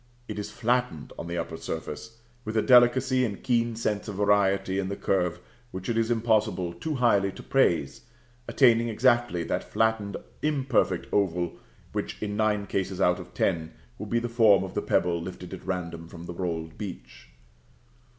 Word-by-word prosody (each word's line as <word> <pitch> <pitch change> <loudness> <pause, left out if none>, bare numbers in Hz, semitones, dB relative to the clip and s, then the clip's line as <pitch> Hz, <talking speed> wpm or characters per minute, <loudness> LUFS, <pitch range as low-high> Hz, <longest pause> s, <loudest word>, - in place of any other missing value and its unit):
It 105 -1 -5
is 105 - -4
flattened 120 -9 -1
on - - -5
the 85 0 -3
upper 80 - -4
surface, 95 +10 -6 0.3
with 110 0 -3
a 110 - +3
delicacy 130 +1 +5
and 105 -5 -3
keen 120 -2 +1
sense 105 -2 -2
of 105 - -5
variety 100 -1 +2
in 95 -1 -2
the 100 - -3
curve 90 -4 0 0.3
which 95 -1 -6
it 115 - 0
is 115 0 +1
impossible 110 -6 +1
too 150 - -4
highly 100 -6 +3
to - - -10
praise, 85 - +1 0.5
attaining 120 -3 +4
exactly 120 -5 +2
that - - -3
flattened, 110 -2 +1 0.2
imperfect 140 -4 +1
oval, 90 -3 +1 0.4
which, - - -4
in 105 -1 -3
nine 105 -1 +1
cases 95 -1 -2
out 90 -1 +3
of 90 0 -11
ten, 80 -4 0 0.3
will - - -5
be 120 - 0
the 120 0 -1
form 110 -5 +5
of 95 - -6
the - - -1
pebble 85 -1 +1
lifted 90 +1 -8
at 95 - -9
random 85 -2 -4
from 85 0 -10
the 85 - -6
rolled 85 -2 -4
beach. 60 - -8
100 Hz, 175 wpm, -27 LUFS, 90-115 Hz, 0.5 s, delicacy